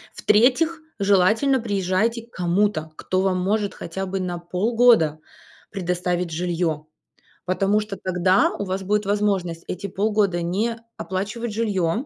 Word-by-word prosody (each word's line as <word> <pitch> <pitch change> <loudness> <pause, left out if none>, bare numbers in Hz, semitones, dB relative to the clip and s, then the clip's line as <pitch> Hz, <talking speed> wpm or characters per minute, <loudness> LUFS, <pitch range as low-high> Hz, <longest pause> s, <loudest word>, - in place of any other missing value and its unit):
В-третьих, 265 +10 +3 0.2
желательно 205 +7 +3
приезжайте 205 +2 0
к 235 - -31
кому-то, 175 -2 0
кто 185 +3 -1
вам 190 -1 +1
может 200 +2 0
хотя 190 +3 -5
бы 190 +1 -3
на 180 -1 -3
полгода 185 -2 +3 0.5
предоставить 180 -2 -2
жилье. 165 -2 -1 0.6
Потому 195 +3 +2
что 210 -2 -6
тогда 185 +1 +2
у - - -3
вас 190 0 -3
будет 210 +2 0
возможность 195 -5 -1
эти 190 +2 -4
полгода 200 -2 0
не 205 +7 -1 0.2
оплачивать 205 +5 -4
жилье, 210 - 0
195 Hz, 130 wpm, -23 LUFS, 180-210 Hz, 0.6 s, В-третьих